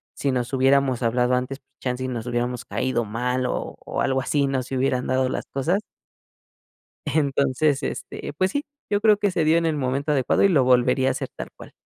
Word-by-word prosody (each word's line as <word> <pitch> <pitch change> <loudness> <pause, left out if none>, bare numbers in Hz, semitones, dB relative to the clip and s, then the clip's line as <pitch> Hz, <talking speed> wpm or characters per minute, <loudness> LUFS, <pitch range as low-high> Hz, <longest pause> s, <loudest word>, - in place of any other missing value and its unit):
si 140 - 0
nos 125 0 -2
hubiéramos 135 -1 +3
hablado 125 +2 +2
antes, 130 +2 -3
pues, - - -53
chance 125 0 -2
y 130 - -2
nos 120 -3 -4
hubiéramos 120 0 -2
caído 130 -2 -1
mal 125 +4 -1
o - - -3
o - - -4
algo 135 0 +1
así, 140 +1 +1
no 135 -1 -1
se 130 +1 -4
hubieran 130 -1 +1
dado 130 0 +2
las - - -4
cosas. 170 +9 0 1.2
Entonces, 140 -1 +1
este, - - -5
pues, 185 0 +2
sí, 285 - -1 0.3
yo 205 0 +1
creo 215 -2 +5
que 205 -2 +1
se 170 -3 +1
dio 160 +2 +4
en 170 - +1
el 160 -1 +1
momento 140 +2 -1
adecuado 135 +4 +2
y 200 - +6
lo 145 -7 +4
volvería 125 +1 +3
a - - +2
hacer - - -4
tal - - -6
cual. - - -12
130 Hz, 215 wpm, -24 LUFS, 125-145 Hz, 1.2 s, y